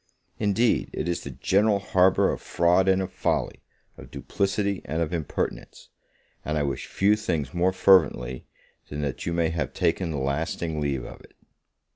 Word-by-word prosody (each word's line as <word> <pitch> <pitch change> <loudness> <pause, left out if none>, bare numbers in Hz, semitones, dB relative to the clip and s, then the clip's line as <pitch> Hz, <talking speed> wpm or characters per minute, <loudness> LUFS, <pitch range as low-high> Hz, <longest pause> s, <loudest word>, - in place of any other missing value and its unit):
Indeed 110 +3 +1
it - - -3
is 85 - -1
the - - -7
general 105 +2 +2
harbour 95 -1 +3
of - - -5
fraud 90 +2 +2
and 95 0 +3
of 95 - -7
folly, - - -1 0.4
of - - -11
duplicity 100 -1 -2
and 80 - -3
of 85 +1 -1
impertinence; 80 -4 -4 0.5
and 75 0 -2
I 75 - +1
wish 70 -1 -3
few 100 +2 +2
things 80 - -3
more 90 +2 +2
fervently, 65 -10 +3 0.4
than 75 0 -4
that 70 +1 -4
you - - 0
may 85 -1 +1
have 80 -4 -3
taken 85 -3 0
a 75 - -3
lasting 75 +3 -2
leave 70 -4 -1
of - - -11
it. - - -19
85 Hz, 170 wpm, -25 LUFS, 75-95 Hz, 0.5 s, harbour